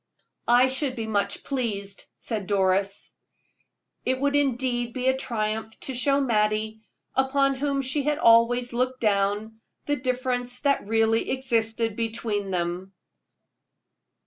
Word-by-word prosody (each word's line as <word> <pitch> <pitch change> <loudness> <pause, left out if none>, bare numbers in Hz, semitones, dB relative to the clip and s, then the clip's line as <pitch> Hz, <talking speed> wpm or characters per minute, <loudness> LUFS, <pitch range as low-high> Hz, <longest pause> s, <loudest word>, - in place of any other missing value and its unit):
"I 245 +2 +6
should 260 0 -1
be 225 -3 -4
much 205 -2 -1
pleased," 205 -7 -3
said 210 -4 -4
Doris. 195 0 0 0.9
It 260 0 0
would 285 +1 +1
indeed 250 -4 0
be 255 0 -2
a 260 - +2
triumph 220 -3 -3
to 265 - -4
show 275 +3 +2
Mattie, 215 -3 0 0.3
upon 275 +1 +2
whom 275 0 -1
she 265 +3 0
had 295 +1 0
always 240 -1 +4
looked 255 +1 -1
down, 210 +1 0 0.2
the 290 0 0
difference 250 -1 -1
that 280 -7 +1
really 225 +1 +2
existed 230 -4 -1
between 220 -3 -2
them. 180 +1 -3
235 Hz, 125 wpm, -25 LUFS, 215-260 Hz, 0.9 s, I